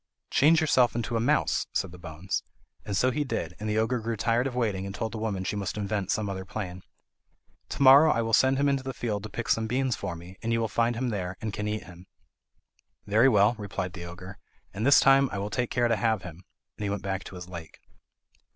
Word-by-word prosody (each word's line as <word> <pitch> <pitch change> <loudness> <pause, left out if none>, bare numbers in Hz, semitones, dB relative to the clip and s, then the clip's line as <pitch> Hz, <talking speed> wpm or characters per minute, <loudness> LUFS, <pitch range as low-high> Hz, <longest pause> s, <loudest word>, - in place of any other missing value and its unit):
"Change 160 +4 +5
yourself 130 -7 +3
into 120 0 -2
a - - +2
mouse," 145 +7 +1
said 95 - -1
the 90 - -12
bones; 85 +2 -4 0.4
and 100 -2 -2
so 130 +4 +3
he 150 +4 -1
did, 90 - -4
and 105 0 -3
the 105 - 0
ogre 115 +3 +1
grew 115 0 -3
tired 115 +4 +1
of 125 - -6
waiting, 100 -6 -1
and 100 - -7
told 110 - -3
the 115 - -5
woman 105 -4 -2
she 95 - -2
must 100 0 -3
invent 100 -2 -2
some 110 -1 0
other 95 -1 -4
plan. 95 -2 -6 0.9
"To - - -1
morrow 140 +4 +8
I 115 - +1
will 115 0 -3
send 130 +3 +4
him 140 +1 +2
into 140 -1 +1
the 135 -1 -6
field 105 -4 -2
to 110 - -7
pick 115 +3 -5
some 110 0 +1
beans 130 +1 0
for 95 -4 -5
me, 90 +3 -12
and 115 0 -2
you 115 - +2
will 115 - 0
find 115 +2 +1
him 125 +2 -1
there, 95 -4 -4
and 110 -2 -4
can 105 +1 -3
eat 105 0 -3
him." 90 +1 -14 1.0
"Very 110 +6 +4
well," 105 -1 +4
replied 95 -3 -4
the 85 -1 -7
ogre, 90 +2 -10 0.3
"and 110 +6 -1
this 140 - +8
time 135 0 +5
I - - -4
will 100 +1 -4
take 125 +2 -1
care 120 -1 +1
to 115 - +2
have 110 -4 0
him," 90 +1 -10 0.3
and - - -4
he 100 - -1
went 100 -2 -3
back 95 -1 -3
to - - -9
his 90 0 -8
lake. 85 -3 -9
110 Hz, 245 wpm, -27 LUFS, 95-120 Hz, 1.0 s, morrow